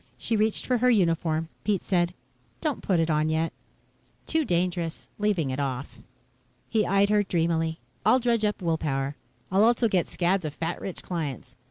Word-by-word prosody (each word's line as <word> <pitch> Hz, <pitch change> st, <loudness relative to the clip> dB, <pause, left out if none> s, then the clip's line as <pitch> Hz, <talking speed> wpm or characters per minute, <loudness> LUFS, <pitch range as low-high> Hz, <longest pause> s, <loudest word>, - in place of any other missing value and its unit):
She 230 Hz, -, -1 dB
reached 215 Hz, 0 st, +1 dB
for 250 Hz, -2 st, +1 dB
her 250 Hz, +2 st, +4 dB
uniform. 165 Hz, -6 st, +2 dB, 0.2 s
Pete 205 Hz, -4 st, 0 dB
said, 175 Hz, -1 st, +1 dB, 0.4 s
"Don't 305 Hz, -4 st, -2 dB
put 185 Hz, -4 st, +1 dB
it 165 Hz, 0 st, +2 dB
on 155 Hz, 0 st, +2 dB
yet." 160 Hz, +1 st, 0 dB, 0.7 s
"Too 320 Hz, -1 st, +1 dB
dangerous 175 Hz, -, -1 dB
leaving 195 Hz, -10 st, +1 dB
it 130 Hz, -, -3 dB
off." 135 Hz, -1 st, -3 dB, 0.7 s
He 220 Hz, -3 st, +1 dB
eyed 200 Hz, +2 st, +3 dB
her 210 Hz, 0 st, +4 dB
dreamily. 165 Hz, -3 st, 0 dB, 0.3 s
"I'll -, -, +5 dB
dredge 235 Hz, -3 st, +1 dB
up 210 Hz, -2 st, 0 dB
will 165 Hz, -2 st, +1 dB
power. 135 Hz, -1 st, -1 dB, 0.4 s
I'll 195 Hz, +2 st, +4 dB
also 235 Hz, +1 st, +4 dB
get 185 Hz, -5 st, +1 dB
scads 180 Hz, +1 st, +1 dB
of 155 Hz, -1 st, -4 dB
fat 165 Hz, +1 st, -3 dB
rich 190 Hz, -, -5 dB
clients. 145 Hz, -7 st, -4 dB
175 Hz, 175 wpm, -27 LUFS, 160-210 Hz, 0.7 s, I'll